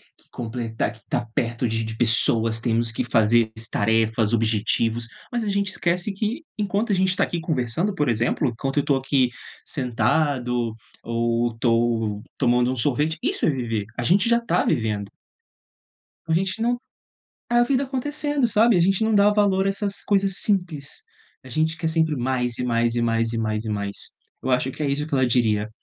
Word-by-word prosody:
que -, -, -30 dB
completar, 115 Hz, -1 st, -3 dB
que 110 Hz, -, -16 dB
estar 120 Hz, +3 st, -3 dB
perto 115 Hz, +1 st, -1 dB
de 115 Hz, 0 st, -1 dB
de 110 Hz, 0 st, -5 dB
pessoas, 115 Hz, -1 st, +3 dB
temos 115 Hz, 0 st, 0 dB
que 115 Hz, -, -2 dB
fazer 110 Hz, 0 st, +3 dB, 0.2 s
tarefas, 110 Hz, 0 st, +1 dB
objetivos, 115 Hz, +1 st, +1 dB, 0.2 s
mas 240 Hz, -2 st, -1 dB
a 210 Hz, -, -2 dB
gente 200 Hz, -1 st, 0 dB
esquece 175 Hz, +4 st, 0 dB
que 220 Hz, +10 st, -3 dB
enquanto 205 Hz, +1 st, -1 dB
a -, -, +3 dB
gente 190 Hz, 0 st, +2 dB
está 185 Hz, -, +2 dB
aqui 175 Hz, -, -2 dB
conversando, 160 Hz, -, 0 dB
por 150 Hz, -4 st, 0 dB
exemplo, 120 Hz, +5 st, +1 dB
enquanto 135 Hz, +4 st, -3 dB
eu -, -, +5 dB
estou 140 Hz, -1 st, +1 dB
aqui 135 Hz, -1 st, +1 dB, 0.4 s
sentado 125 Hz, -1 st, 0 dB, 0.3 s
ou 115 Hz, 0 st, 0 dB
to -, -, -17 dB
estou 115 Hz, -3 st, 0 dB
tomando 125 Hz, +1 st, +2 dB
um -, -, -2 dB
sorvete, 145 Hz, +6 st, 0 dB
isso -, -, +1 dB
é -, -, +3 dB
viver, 115 Hz, -7 st, -2 dB
a 125 Hz, -, -2 dB
gente 195 Hz, -, +3 dB
já 235 Hz, -, +5 dB
está 230 Hz, -7 st, 0 dB
vivendo. 110 Hz, -7 st, -1 dB, 1.2 s
A 160 Hz, -, +1 dB
gente 190 Hz, +5 st, 0 dB
não 240 Hz, +1 st, +1 dB, 0.7 s
a 240 Hz, 0 st, +4 dB
vida 265 Hz, +2 st, +1 dB
acontecendo 290 Hz, +1 st, 0 dB
sabe, 225 Hz, 0 st, +4 dB
a -, -, +3 dB
gente 195 Hz, +5 st, +2 dB
não 220 Hz, -, +1 dB
dá 205 Hz, 0 st, +5 dB
valor 200 Hz, -2 st, +2 dB
a -, -, +3 dB
essas 200 Hz, 0 st, -1 dB
coisas 195 Hz, -2 st, +2 dB
simples 175 Hz, -9 st, -1 dB, 0.4 s
a -, -, -11 dB
gente 160 Hz, +5 st, 0 dB
quer 165 Hz, -2 st, -2 dB
sempre 160 Hz, -1 st, +1 dB
mais 125 Hz, -1 st, -1 dB
e 125 Hz, -, -2 dB
mais 120 Hz, -1 st, +1 dB
e 120 Hz, -, +1 dB
mais 115 Hz, 0 st, +1 dB
e 115 Hz, -, -2 dB
mais 110 Hz, -1 st, -2 dB
e -, -, -5 dB
mais, 100 Hz, -1 st, -3 dB, 0.5 s
eu -, -, -2 dB
acho 125 Hz, +1 st, +1 dB
que -, -, -7 dB
é 145 Hz, -, 0 dB
isso 145 Hz, +2 st, -1 dB
que 155 Hz, -, -14 dB
ela 130 Hz, -1 st, +3 dB
diria. 110 Hz, -4 st, +1 dB
130 Hz, 190 wpm, -23 LUFS, 115-190 Hz, 1.2 s, eu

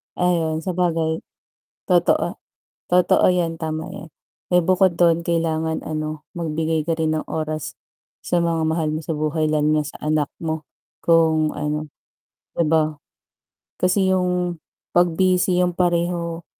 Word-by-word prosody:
Ayun, 165 Hz, -3 st, 0 dB
sabagay. 165 Hz, -3 st, 0 dB, 0.7 s
Totoo, -, -, +2 dB, 0.6 s
totoo 180 Hz, 0 st, +4 dB
'yan. 175 Hz, -2 st, 0 dB
Tama 160 Hz, -1 st, -3 dB
'yan. 160 Hz, -, -9 dB, 0.4 s
Eh, 180 Hz, -, +5 dB
bukod 185 Hz, 0 st, +2 dB
dun 170 Hz, -1 st, +4 dB
kailangan 160 Hz, -1 st, -1 dB
ano, 155 Hz, 0 st, -4 dB
magbigay 160 Hz, -1 st, -1 dB
ka 165 Hz, -1 st, -1 dB
rin 155 Hz, -1 st, +1 dB
ng 155 Hz, -, -2 dB
oras 155 Hz, -1 st, -4 dB, 0.5 s
sa 175 Hz, -1 st, +2 dB
mga 165 Hz, -1 st, 0 dB
mahal 160 Hz, -1 st, 0 dB
mo 155 Hz, -, -2 dB
sa 165 Hz, -, -1 dB
buhay 155 Hz, +1 st, 0 dB
lalo 150 Hz, -1 st, +1 dB
na 155 Hz, -1 st, +2 dB
sa 145 Hz, -, -9 dB
anak 150 Hz, -1 st, +1 dB, 0.2 s
mo 160 Hz, -1 st, -3 dB, 0.4 s
kung 160 Hz, -2 st, +3 dB
ano, 150 Hz, +1 st, -2 dB, 0.7 s
di 170 Hz, -, +2 dB
ba? 155 Hz, -1 st, +2 dB, 0.9 s
Kasi 190 Hz, +1 st, +3 dB
yung 180 Hz, -2 st, 0 dB, 0.3 s
'pag 175 Hz, 0 st, +4 dB
busy 185 Hz, -1 st, +3 dB
yung 180 Hz, -1 st, +1 dB
pareho 170 Hz, -1 st, -1 dB
165 Hz, 135 wpm, -22 LUFS, 155-175 Hz, 0.9 s, Eh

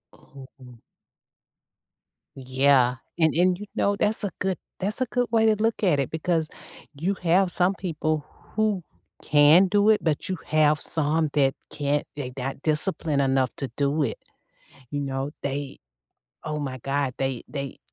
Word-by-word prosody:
Oh. 130 Hz, -3 st, -15 dB, 1.6 s
Yeah, 130 Hz, -1 st, +3 dB, 0.2 s
and 160 Hz, -2 st, +4 dB
and, 180 Hz, +1 st, +3 dB
you 210 Hz, -, -6 dB
know, 200 Hz, -, +1 dB
that's 210 Hz, +2 st, 0 dB
a 200 Hz, -, -1 dB
good 190 Hz, -1 st, -1 dB, 0.2 s
that's 205 Hz, +6 st, -2 dB
a -, -, +3 dB
good 245 Hz, 0 st, -1 dB
way 225 Hz, -1 st, +3 dB
to 220 Hz, -1 st, +4 dB
look 225 Hz, +1 st, -1 dB
at 170 Hz, -8 st, +3 dB
it 135 Hz, -, -1 dB
because 160 Hz, 0 st, -1 dB, 0.5 s
you 170 Hz, +8 st, -1 dB
have 180 Hz, +2 st, +3 dB
some 185 Hz, +2 st, +2 dB
people 155 Hz, -4 st, -2 dB, 0.3 s
who 215 Hz, -4 st, +1 dB, 0.4 s
can 150 Hz, +6 st, +6 dB
do 205 Hz, +2 st, +3 dB
it, 215 Hz, -, +3 dB
but 155 Hz, -3 st, 0 dB
you 185 Hz, -, -2 dB
have 155 Hz, -1 st, +3 dB
some 155 Hz, 0 st, 0 dB
that 135 Hz, -2 st, +3 dB, 0.2 s
can't, 145 Hz, 0 st, -1 dB
they 130 Hz, -3 st, -5 dB
not 135 Hz, +1 st, -4 dB
disciplined 155 Hz, -1 st, +2 dB
enough 135 Hz, -1 st, +2 dB
to 135 Hz, -, -4 dB
do 145 Hz, +2 st, +1 dB
it. -, -, -2 dB, 0.7 s
You 145 Hz, -, -2 dB
know, 135 Hz, 0 st, -3 dB
they 140 Hz, 0 st, -4 dB, 0.7 s
oh 150 Hz, -1 st, -3 dB
my 135 Hz, -3 st, -4 dB
god, 135 Hz, 0 st, -1 dB
they 135 Hz, -3 st, -2 dB
they 140 Hz, -2 st, -5 dB
150 Hz, 155 wpm, -25 LUFS, 140-185 Hz, 1.6 s, can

